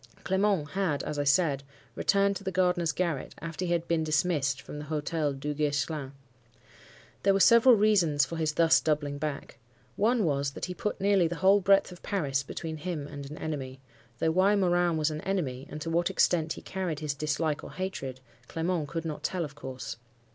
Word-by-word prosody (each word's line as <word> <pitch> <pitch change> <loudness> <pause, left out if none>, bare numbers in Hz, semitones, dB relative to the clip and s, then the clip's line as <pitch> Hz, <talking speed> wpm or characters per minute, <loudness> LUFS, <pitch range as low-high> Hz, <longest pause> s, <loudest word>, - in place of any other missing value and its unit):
Clement 190 -5 +1
had, 185 -7 -1
as 150 - -4
I 145 - 0
said, 140 -2 +3 0.3
returned 200 0 +2
to - - -12
the 190 - -2
gardener's 180 -2 +2
garret 165 -3 -2
after 165 +2 -4
he 175 - -2
had 170 -1 0
been 165 -1 +1
dismissed 150 -3 +1
from 150 - -8
the 150 - -7
Hotel 150 0 -1
Duguesclin. 145 0 -2 1.1
There 195 0 +3
were - - +2
several 235 +4 +7
reasons 185 -10 +3
for 165 +4 -6
his 155 -1 0
thus 165 0 +5
doubling 145 -2 -1
back. 145 -4 -5 0.4
One 225 0 +2
was, 140 -2 0
that - - -4
he 180 - -5
put 210 +3 -3
nearly 195 -3 +3
the 175 - -4
whole 195 +3 +4
breadth 195 0 +4
of 180 - -12
Paris 145 -9 -1
between 160 +3 -6
him 155 -2 -4
and 140 -1 -8
an 150 - -8
enemy; 135 -4 -5 0.4
though 160 +6 +1
why 190 +4 +4
Morin 175 -3 +2
was 155 0 +1
an 155 0 -5
enemy, 145 -9 -2
and 150 - -6
to 165 - -3
what 170 +1 +2
extent 160 -3 +2
he - - -11
carried 180 -5 -3
his 150 -2 -1
dislike 150 +1 -1
or - - -9
hatred, 135 -9 -5 0.3
Clement 165 -2 -1
could 165 +2 -4
not 155 -2 -4
tell, 180 -3 -1
of 145 - -10
course. 130 -5 -7
160 Hz, 195 wpm, -29 LUFS, 145-185 Hz, 1.1 s, several